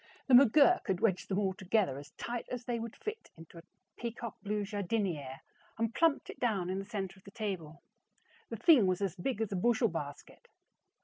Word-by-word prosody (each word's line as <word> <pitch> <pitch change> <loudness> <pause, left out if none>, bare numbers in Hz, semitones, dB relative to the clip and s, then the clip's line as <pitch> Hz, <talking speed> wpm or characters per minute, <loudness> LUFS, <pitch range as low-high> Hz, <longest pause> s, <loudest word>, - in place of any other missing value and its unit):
The 265 - +1
McGurk 280 +7 +6
had 190 -3 0
wedged 190 -4 +1
them 195 - 0
all 195 -2 +1
together 190 -7 0
as 145 +1 -11
tight 240 0 -4
as 250 -1 -5
they 240 -1 -2
would 230 -1 -6
fit 430 +1 -6
into 165 +1 -12
a - - -14 0.3
peacock 235 -1 -5
blue 210 0 -2
jardiniere, 190 - -2 0.4
and 230 0 -1
plumped 325 -4 +2
it - - -15
down 200 -7 0
in 190 - -2
the 195 - -5
center 195 -3 -5
of - - -26
the - - -12
table. 190 -8 -5 0.7
The - - -4
thing 280 - +6
was 185 +2 0
as 195 -2 -1
big 220 +5 -2
as 220 - -1
a - - -1
bushel 230 +4 +2
basket. 145 -4 -7
205 Hz, 200 wpm, -32 LUFS, 185-235 Hz, 0.7 s, McGurk